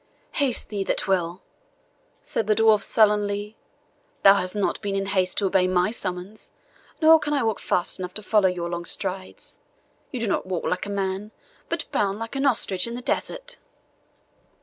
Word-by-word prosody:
"Haste 270 -6 -1
he 200 -2 -1
that - - -1
will," 180 -1 0 0.8
said 220 - -2
the 215 - +3
dwarf 220 -1 +5
sullenly; 210 -1 +2 0.7
"thou 195 - +9
hast 185 -1 -1
not 205 - -1
been 200 -2 -2
in 195 0 -1
haste 190 -2 0
to 205 - +1
obey 185 -1 +3
my 185 +2 +2
summons, 190 -1 -6 0.5
nor 320 +1 +8
can 295 -1 -2
I 280 -4 +1
walk 220 -2 0
fast 175 - 0
enough 180 -1 -6
to 215 - -4
follow 205 -3 +3
your 175 -1 -3
long 175 0 -4
strides 185 +2 -5 0.5
you 255 - -5
do 230 - -1
not 195 - -1
walk 185 -3 -2
like 180 +2 -1
a - - -6
man, 195 +1 -2 0.4
but - - -2
bound 200 -1 0
like 225 +4 -6
an 275 +1 +2
ostrich 200 -6 +1
in 235 - -5
the 245 - -6
desert." - - -3
200 Hz, 180 wpm, -24 LUFS, 185-220 Hz, 0.8 s, thou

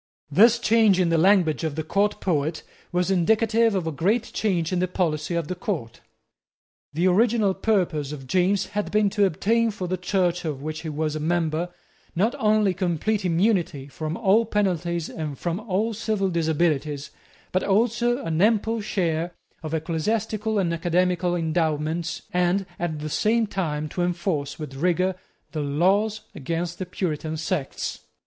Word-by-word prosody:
This 225 +9 +6
change 220 -4 +4
in 180 -2 +3
the 165 - +3
language 180 -3 +3
of 155 -3 -2
the 160 - -2
court 205 +6 0
poet 160 -4 -1 0.3
was 180 +1 +1
indicative 220 +4 +3
of 185 -3 -1
a 160 - -1
great 200 +10 +1
change 180 -5 0
in 180 - +1
the 185 - +1
policy 170 -2 -1
of 170 -3 -1
the 185 - -2
court. 175 - -4 0.9
The 165 +5 0
original 210 +1 +3
purpose 180 -10 0
of 140 -3 -7
James 185 +7 +2
had 210 0 -1
been 210 -1 +2
to 205 -1 +3
obtain 225 +6 +1
for 195 -4 -4
the 185 +1 -1
Church 180 -1 0
of 145 -4 -4
which 155 +1 -4
he 160 - -5
was 155 0 -2
a - - -2
member, 165 +1 0 0.5
not 210 +7 +2
only 215 -2 +3
complete 185 +3 -1
immunity 175 -6 +1
from 155 +4 -4
all 220 +1 +4
penalties 175 -5 0
and 150 -4 -5
from 175 +1 -2
all 215 +1 -1
civil 210 -2 -1
disabilities, 155 -3 0 0.4
but 185 - +1
also 235 +4 +1
an 165 +1 0
ample 225 +1 +2
share 170 -4 -1 0.3
of 160 0 -3
ecclesiastical 215 +7 -1
and 175 -4 +1
academical 175 +1 +1
endowments, 160 0 -1
and 180 +2 +2
at 160 -3 -3
the 155 - -3
same 225 +8 +2
time 155 -7 -2
to 180 - -3
enforce 175 -5 -1
with 150 -3 -7
rigour 180 +5 +1 0.4
the 155 - -3
laws 190 +9 +1
against 170 +2 -3
the 185 - -4
Puritan 160 -3 -3
sects. 160 -3 -3
180 Hz, 160 wpm, -24 LUFS, 160-205 Hz, 0.9 s, This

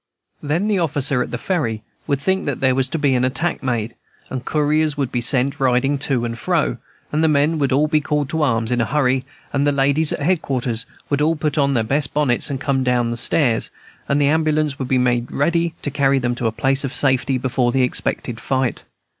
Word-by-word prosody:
Then 160 +8 -1
the 205 -3 +1
officer 140 -5 0
at - - -2
the 125 - -3
Ferry 120 - -2 0.2
would 140 -3 0
think 190 +5 -1
that 140 - -2
there 130 -1 +3
was 130 0 +1
to - - -2
be 145 -3 +2
an 125 -1 +1
attack 130 +7 0
made, 120 -3 -2 0.4
and 130 -1 -4
couriers 150 +1 +1
would 140 -3 -1
be 120 - -1
sent, 130 +2 +2
riding 135 +2 +2
to 135 -4 0
and 115 0 -3
fro, 155 -2 0 0.3
and 155 +2 +1
the - - +4
men 155 +1 +2
would 140 -2 +1
all 145 +4 +3
be 155 -1 +2
called 150 -1 -1
to 160 0 -1
arms 115 -5 +1
in 120 -1 +1
a - - +1
hurry, 130 -1 +1 0.3
and 140 0 +1
the - - +4
ladies 140 +3 +2
at - - -3
headquarters 130 -8 -1 0.2
would 145 0 +1
all 160 +2 +2
put 150 -2 -2
on 140 -1 +2
their 115 - +2
best 135 +5 -1
bonnets 145 -4 +1
and 135 -2 -3
come 135 -2 0
down 120 -2 +1
stairs, 120 0 +1 0.4
and 140 - +2
the 145 - +3
ambulance 155 -1 +1
would 130 - -3
be 130 - +2
made 120 -1 0
ready 170 +3 0
to 145 - -2
carry 140 -1 +2
them 120 -2 0
to 120 -1 -2
a - - 0
place 135 +4 +1
of 135 - -3
safety 130 -1 +1
before 125 -1 0
the 130 +1 +2
expected 120 -1 -2
fight. 130 0 -1
135 Hz, 225 wpm, -20 LUFS, 125-150 Hz, 0.4 s, the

